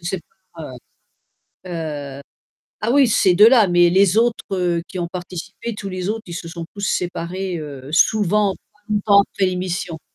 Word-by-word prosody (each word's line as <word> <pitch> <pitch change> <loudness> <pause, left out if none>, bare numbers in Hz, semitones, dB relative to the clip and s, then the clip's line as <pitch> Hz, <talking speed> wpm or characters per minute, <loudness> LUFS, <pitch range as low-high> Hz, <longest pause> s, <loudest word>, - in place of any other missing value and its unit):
Ils 170 - -8
se 190 - -1
séparent, 170 -6 -12 0.9
heu. - - -7 0.5
Heu, - - -11 0.6
ah 225 - 0
oui, 275 -1 +5
ces 185 -4 +3
2 210 +4 +8
là, 230 -6 +5
mais 175 0 +4
les 190 +1 +3
autres, 230 0 +2
heu, 175 -3 0
qui 185 - -7
ont 170 -1 -2
participé, 185 +5 -7
tous 205 -1 -6
les 185 0 -4
autres, 220 +1 -2
ils 170 - -7
se 170 - -6
sont 165 0 -7
tous 205 - -8
séparés, 180 0 -2
heu, 140 -3 -8
souvent 205 +2 +3 0.2
pas - - -33
longtemps 205 -1 +4
après 190 - +1
l'émission. 180 -2 -3
185 Hz, 185 wpm, -20 LUFS, 175-205 Hz, 0.9 s, 2